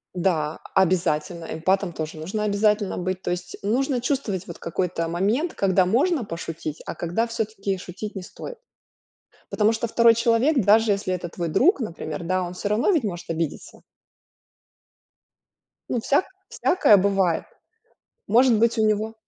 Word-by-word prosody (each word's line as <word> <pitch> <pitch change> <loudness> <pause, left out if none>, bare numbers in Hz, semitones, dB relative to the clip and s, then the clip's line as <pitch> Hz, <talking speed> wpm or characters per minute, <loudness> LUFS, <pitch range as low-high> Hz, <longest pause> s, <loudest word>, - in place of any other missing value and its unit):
Да, 165 -4 0
обязательно, 170 -2 +1
эмпатом 185 +3 0
тоже 155 0 -5
нужно 190 +7 -3
обязательно 210 0 +1
быть. 185 +1 -3
То - - -4
есть 180 0 -5
нужно 250 +5 0
чувствовать 235 -8 -2
вот 170 - -8
какой-то 170 0 -2
момент, 210 - 0
когда 190 -1 +2
можно 260 - +1
пошутить, 165 -3 -6
а - - -5
когда 175 +8 -1
всё-таки 215 -4 -3
шутить 190 +4 -7
не 190 - -5
стоит. 480 - -9 0.9
Потому 215 +1 +2
что 225 +1 -2
2 230 +1 +5
человек, 235 +3 +2
даже 215 +2 +5
если 195 -2 -2
это 180 -1 -4
твой 170 0 -4
друг, 290 - +3
например, 175 -5 -5
да, 185 +2 0
он 175 0 -5
всё 190 - -3
равно 215 - +2
ведь 330 -8 +2
может 175 -4 -5
обидеться. 165 -2 -4 2.1
Ну, 245 - +1
всяк 285 - +2 0.2
всякое 215 - +4
бывает, 190 -3 +1 0.8
может 240 +2 +5
быть, 230 +2 +2
у 220 - +3
него 215 +1 0
200 Hz, 150 wpm, -24 LUFS, 175-230 Hz, 2.1 s, 2